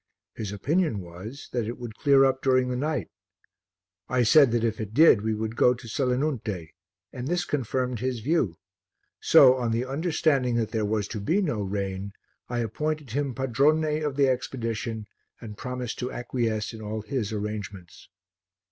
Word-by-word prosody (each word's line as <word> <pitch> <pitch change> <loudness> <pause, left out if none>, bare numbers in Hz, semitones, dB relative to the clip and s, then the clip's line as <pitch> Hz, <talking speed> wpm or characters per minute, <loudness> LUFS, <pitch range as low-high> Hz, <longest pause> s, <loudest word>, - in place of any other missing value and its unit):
His 105 -3 -5
opinion 145 - 0
was 95 +10 -9
that 120 -3 -1
it 120 - -4
would 120 -3 -7
clear 135 +2 +4
up 130 0 +1
during 130 -1 +2
the 125 - -1
night; 140 - -2 1.0
I 125 -1 +2
said 140 +4 +6
that 115 0 0
if 110 -1 -1
it 110 0 -6
did 150 -8 +7
we 110 0 -1
would 110 +1 -3
go 125 +1 +4
to 120 -1 -12
Selinunte, 125 - -1 0.4
and 125 0 -5
this 175 +2 0
confirmed 125 -3 -1
his 125 0 -2
view; 120 - 0 0.6
so, 130 -2 +7
on 120 -2 -1
the 115 +2 0
understanding 140 -3 +1
that 115 -2 0
there 110 -2 0
was 105 -1 -1
to 110 - -4
be 160 - +1
no 150 - -1
rain, 100 0 -3 0.4
I 120 -1 -1
appointed 150 +4 -3
him 140 0 -1
padrone 150 +4 +2
of 145 -2 -2
the 140 -1 +4
expedition 115 -4 -2 0.3
and 110 -3 -8
promised 125 0 -5
to 125 0 -3
acquiesce 115 -3 -2
in 110 - -9
all 105 0 -4
his 115 -3 -2
arrangements. 105 -4 -6
120 Hz, 170 wpm, -26 LUFS, 110-135 Hz, 1.0 s, did